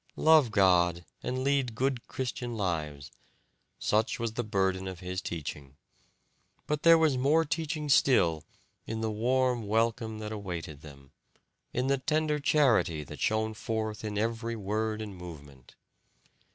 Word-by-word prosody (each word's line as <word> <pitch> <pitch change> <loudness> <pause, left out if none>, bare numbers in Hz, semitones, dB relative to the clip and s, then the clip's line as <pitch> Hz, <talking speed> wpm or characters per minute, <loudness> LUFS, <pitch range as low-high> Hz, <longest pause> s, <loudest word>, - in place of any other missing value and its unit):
"Love 155 -5 +5
God, 90 -4 +3 0.2
and 130 +1 -2
lead 135 -4 +1
good 130 0 -1
Christian 120 -2 -4
lives," 75 -7 -3 0.7
such 110 +3 +1
was 115 -2 -3
the 120 - -2
burden 95 -3 0
of 95 -2 -6
his 90 0 -4
teaching; 70 -4 -6 0.9
but 150 0 -1
there 165 0 +7
was 155 -5 +2
more 155 +5 +3
teaching 155 0 -3
still 85 - +4 0.4
in 110 0 -3
the 110 -1 -1
warm 125 +1 +1
welcome 110 0 0
that 110 0 -6
awaited 85 -8 -6
them, 70 -2 -14 0.6
in 125 - -1
the 135 0 +1
tender 150 +2 0
charity 120 - +2
that - - -10
shone 110 0 0
forth 110 0 -3
in 105 -1 -3
every 115 +2 -1
word 110 +1 -2
and 105 -3 -8
movement. 75 -7 -12
110 Hz, 140 wpm, -29 LUFS, 90-130 Hz, 0.9 s, there